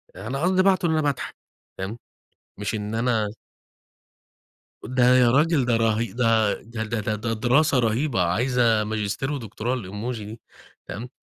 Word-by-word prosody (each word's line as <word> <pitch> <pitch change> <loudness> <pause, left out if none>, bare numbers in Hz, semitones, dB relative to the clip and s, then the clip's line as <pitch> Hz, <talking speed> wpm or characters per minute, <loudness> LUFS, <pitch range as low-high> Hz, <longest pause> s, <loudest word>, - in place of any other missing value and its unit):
أنا 125 +9 -5
قصدي 185 +2 +3
باعته، 190 -2 +3
إن 165 - +2
أنا 155 -1 +2
باضحك، 145 -3 -2 0.4
تمام. 95 +4 -5 0.6
مش 105 +2 -3
إن 105 +1 -4
أنا 115 -2 +1 1.6
ده 125 0 +3
يا 120 -2 +5
راجل، 145 -1 +3
ده 120 -2 +2
رهي 115 0 0
ده 115 -3 +2
ده 115 0 -6
ده 110 +1 -3
ده 105 0 -1
ده 115 +2 -2
دراسة 125 +5 +3
رهيبة 115 0 +1
عايزة 115 +4 +2
ماجستير 110 +5 -2
ودكتوراه 120 -2 -3
الemoji 115 +2 -5
دي 105 +2 -8 0.5
فاهم، 115 +5 -6
115 Hz, 150 wpm, -24 LUFS, 110-130 Hz, 1.6 s, يا